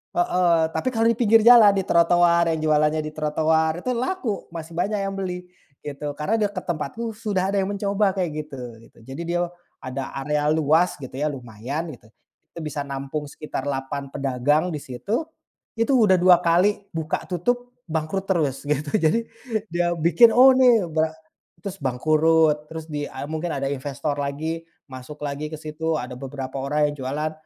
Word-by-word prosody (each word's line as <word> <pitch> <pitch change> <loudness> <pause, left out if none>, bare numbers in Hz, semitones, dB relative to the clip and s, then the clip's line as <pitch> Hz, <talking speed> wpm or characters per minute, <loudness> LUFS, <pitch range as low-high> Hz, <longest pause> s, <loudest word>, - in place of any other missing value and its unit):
Heeh, 175 -1 +3
tapi 255 - -1
kalau 225 -2 0
di - - -1
pinggir 225 -2 +5
jalan, 225 -4 +8
di 195 - 0
trotoar, 170 0 +4
yang 160 -1 0
jualannya 155 0 +2
di 155 - -5
trotoar, 160 +2 0
itu 255 - -1
laku, 250 - -2
masih 165 -1 -8
banyak 200 +5 -1
yang 195 0 -3
beli, 180 -2 -4 0.4
gitu. 145 0 -5
Karena 210 +9 0
deket 205 -3 -1
tempatku 175 +8 -3
sudah 205 -4 -1
ada 200 - +1
yang 190 - -1
mencoba 200 -1 0
kayak 180 -4 -1 0.2
gitu 140 - -9 0.3
gitu. - - -29
Jadi 135 +7 -7
dia 175 +1 0 0.4
ada 130 +1 -4
area 150 +1 0
luas 160 +3 +3
gitu 130 -3 -9
ya, 145 +3 -1
lumayan 135 +5 -5
gitu. 115 - -16 0.5
Itu - - -6
bisa 150 -1 -3
nampung 140 +2 -4
sekitar 145 -2 -6
8 135 0 -3
pedagang 140 +5 0
di 150 - -3
situ, 200 - -3 0.5
itu 230 +4 +1
udah 215 -7 +5
2 180 0 +6
kali 190 +4 +2
buka 160 -1 -3
tutup, 245 +8 -2
bangkrut 160 +4 -2
terus, 160 -9 0
gitu. 150 0 -1
Jadi, 225 +9 +1 0.4
dia 175 0 0
bikin, 175 +9 +5
oh 260 +1 +7
ini 245 -7 +5
bre 160 0 0 0.5
terus 195 +1 -6
bangkrut, 155 +3 +2
terus 160 -1 -7
di, 145 -1 -3
eee, 135 +1 -7
mungkin 160 +2 -3
ada 135 -1 -2
investor 140 +1 -3
lagi, 155 +4 -3 0.2
masuk 130 +2 -10
lagi 145 +2 -4
ke 155 - -5
situ, 155 +1 -2
ada 125 0 -6
beberapa 135 0 -7
orang 150 +2 +1
yang - - -8
jualan, 150 +4 -2
160 Hz, 175 wpm, -23 LUFS, 145-190 Hz, 0.5 s, jalan